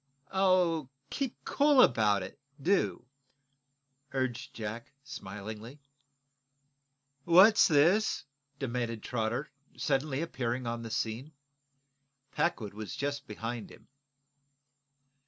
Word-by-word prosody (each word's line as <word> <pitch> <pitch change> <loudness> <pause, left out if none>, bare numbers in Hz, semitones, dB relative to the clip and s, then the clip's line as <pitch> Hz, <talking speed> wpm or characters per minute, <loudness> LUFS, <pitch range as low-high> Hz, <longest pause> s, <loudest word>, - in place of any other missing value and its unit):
"Oh, 180 -6 +2 0.2
keep 270 -4 -2
cool 290 -1 +4
about 105 - +4
it, 95 - -10 0.2
do," 180 -5 +1 1.1
urged 130 -3 -2
Jack, 115 +3 -6
smilingly. 110 +3 -8 1.4
"What's 190 +7 +7
this?" 170 +5 +3 0.3
demanded 120 -4 -3
Trotter, 120 +4 -2 0.3
suddenly 140 +1 0
appearing 125 -5 -3
on 115 0 -3
the 115 - -6
scene. 115 +7 -3 1.0
Packwood 110 - -1
was 105 0 -6
just 145 +1 -3
behind 115 +1 -5
him. - - -17
130 Hz, 90 wpm, -31 LUFS, 115-160 Hz, 1.4 s, What's